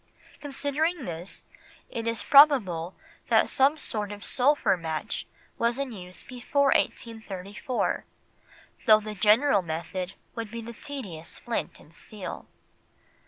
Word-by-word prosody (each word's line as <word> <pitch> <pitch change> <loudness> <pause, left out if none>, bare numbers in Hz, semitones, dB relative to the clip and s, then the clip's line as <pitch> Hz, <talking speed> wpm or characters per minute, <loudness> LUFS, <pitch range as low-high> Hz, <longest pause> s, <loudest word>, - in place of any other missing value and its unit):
Considering 290 +2 -1
this, 170 +2 -6 0.4
it 230 0 -5
is 230 -3 -1
probable 205 - +5 0.3
that - - +5
some 275 +4 +3
sort 210 -7 -1
of 205 0 -4
sulphur 280 -3 +3
match 160 -3 -4 0.3
was 235 +1 +1
in 275 -2 -3
use 185 -4 -8
before 270 +2 0
1834, 215 +1 -2 0.8
though 215 -1 +8
the 215 0 -6
general 210 +4 +4
method 175 +3 -4 0.2
would 230 -2 -5
be 230 +2 -6
the 235 +1 -8
tedious 205 - -7
flint 235 -1 -4
and 160 - -18
steel. 200 +1 -8
225 Hz, 120 wpm, -27 LUFS, 185-270 Hz, 0.8 s, though